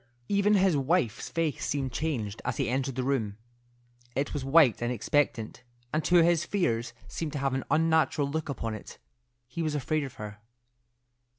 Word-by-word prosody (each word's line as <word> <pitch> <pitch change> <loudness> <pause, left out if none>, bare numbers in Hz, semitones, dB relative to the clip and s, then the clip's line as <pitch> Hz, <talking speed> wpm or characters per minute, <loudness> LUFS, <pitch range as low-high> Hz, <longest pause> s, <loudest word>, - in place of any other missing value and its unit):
Even 200 +1 +3
his 190 -4 +4
wife's 140 - 0
face 165 -4 -1
seemed 135 -2 -1
changed 120 -9 -2
as - - -2
he - - 0
entered 130 +1 -1
the 130 - -1
room. 115 -7 -1 0.8
It 140 +3 -1
was 145 -3 -2
white 135 -4 +5
and 120 +1 0
expectant, 125 -1 0 0.3
and 155 0 +1
to 175 -1 +6
his 170 -1 +3
fears 125 - -1
seemed 155 -3 -4
to - - -2
have 135 -1 0
an 135 - -2
unnatural 160 -2 +3
look 155 +2 -3
upon 115 -4 -3
it. 110 - -9 0.5
He 130 +7 -5
was 155 -2 -1
afraid 150 +2 0
of 135 - -7
her. 105 0 -8
140 Hz, 175 wpm, -29 LUFS, 125-160 Hz, 0.8 s, to